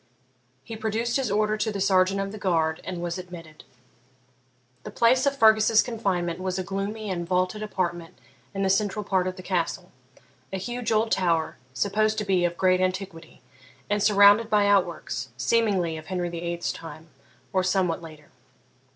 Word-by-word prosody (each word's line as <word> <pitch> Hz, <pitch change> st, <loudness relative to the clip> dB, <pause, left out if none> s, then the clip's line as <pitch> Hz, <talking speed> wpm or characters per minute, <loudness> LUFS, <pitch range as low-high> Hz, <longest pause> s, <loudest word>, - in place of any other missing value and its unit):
He 225 Hz, -, -8 dB
produced 220 Hz, +3 st, -1 dB
his 265 Hz, -4 st, -1 dB
order 215 Hz, +1 st, +1 dB
to 215 Hz, +1 st, -1 dB
the 200 Hz, -, -4 dB
sergeant 190 Hz, 0 st, +2 dB
of 195 Hz, 0 st, -3 dB
the 215 Hz, -, -8 dB
guard 160 Hz, -4 st, 0 dB
and 175 Hz, -1 st, -5 dB
was 175 Hz, +1 st, -3 dB
admitted. 170 Hz, -4 st, -11 dB, 1.2 s
The -, -, -8 dB
place 255 Hz, +4 st, +3 dB
of 280 Hz, 0 st, 0 dB
Fergus's 220 Hz, -1 st, +5 dB
confinement 185 Hz, -7 st, -2 dB
was 185 Hz, 0 st, -3 dB
a 185 Hz, -, -2 dB
gloomy 200 Hz, +2 st, -4 dB
and 175 Hz, -2 st, -3 dB
vaulted 185 Hz, +3 st, 0 dB
apartment 175 Hz, -5 st, -3 dB, 0.4 s
in 195 Hz, -, -1 dB
the 190 Hz, -, +1 dB
central 205 Hz, +1 st, 0 dB
part 185 Hz, -2 st, +1 dB
of 185 Hz, -, -3 dB
the 185 Hz, -, -10 dB
Castle; 180 Hz, 0 st, -2 dB, 0.6 s
a 190 Hz, -, -2 dB
huge 240 Hz, +4 st, -4 dB
old 220 Hz, +1 st, +1 dB
tower, 170 Hz, -4 st, +1 dB, 0.2 s
supposed 215 Hz, +6 st, +1 dB
to 210 Hz, -, -2 dB
be 185 Hz, -3 st, +2 dB
of 175 Hz, 0 st, -2 dB
great 185 Hz, -1 st, +3 dB
antiquity, 185 Hz, -2 st, -4 dB, 0.5 s
and 205 Hz, 0 st, +1 dB
surrounded 205 Hz, +2 st, +6 dB
by 210 Hz, -2 st, +3 dB
outworks, 185 Hz, -8 st, 0 dB
seemingly 180 Hz, -, +1 dB
of 155 Hz, 0 st, -10 dB
Henry 180 Hz, -1 st, -2 dB
VIII's 170 Hz, 0 st, -3 dB
time, 160 Hz, 0 st, -11 dB, 0.4 s
or 185 Hz, -1 st, +2 dB
somewhat 185 Hz, -3 st, 0 dB
later. 155 Hz, -2 st, -13 dB
190 Hz, 170 wpm, -25 LUFS, 175-215 Hz, 1.2 s, surrounded